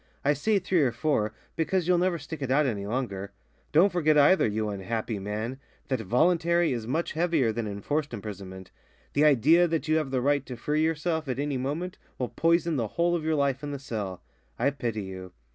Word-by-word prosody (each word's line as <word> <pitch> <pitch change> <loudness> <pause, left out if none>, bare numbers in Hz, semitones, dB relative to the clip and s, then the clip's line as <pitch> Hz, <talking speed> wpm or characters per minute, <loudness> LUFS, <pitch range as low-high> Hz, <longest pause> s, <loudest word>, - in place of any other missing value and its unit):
I 145 - +5
say 205 +9 +1
three 185 -2 +1
or 130 -4 +3
four, 115 -4 0 0.2
because 175 +2 0
you'll 180 -1 +4
never 180 -1 +1
stick 155 0 -8
it 135 - -2
out 145 +3 +3
any 100 -6 -2
longer. 100 -5 -3 0.4
Don't 180 +6 +5
forget 155 -4 +3
either, 145 +4 +5
you 110 0 -1
unhappy 105 +2 -3
man, 110 +6 -4 0.3
that 130 -3 0
voluntary 170 - +2
is 115 -2 -4
much 160 +7 -1
heavier 160 -8 +1
than 110 0 -3
enforced 140 +9 -2
imprisonment. 95 -4 -8 0.4
The 145 +2 +4
idea 155 +5 +5
that 165 -1 -2
you 155 +1 +3
have 155 -4 -1
the 130 -1 0
right 140 +1 +2
to 125 - -6
free 150 +5 0
yourself 160 0 0
at 130 -2 -2
any 140 -1 -1
moment 150 +8 -3 0.2
will 125 - -2
poison 170 -1 +2
the 115 -3 0
whole 170 +9 +1
of 165 - -2
your 160 0 +1
life 140 -2 +1
in 145 - -5
the 140 - -4
cell. 105 -9 -5 0.3
I 140 - +2
pity 115 -6 -3
you." 95 -1 -8
140 Hz, 205 wpm, -27 LUFS, 110-160 Hz, 0.4 s, I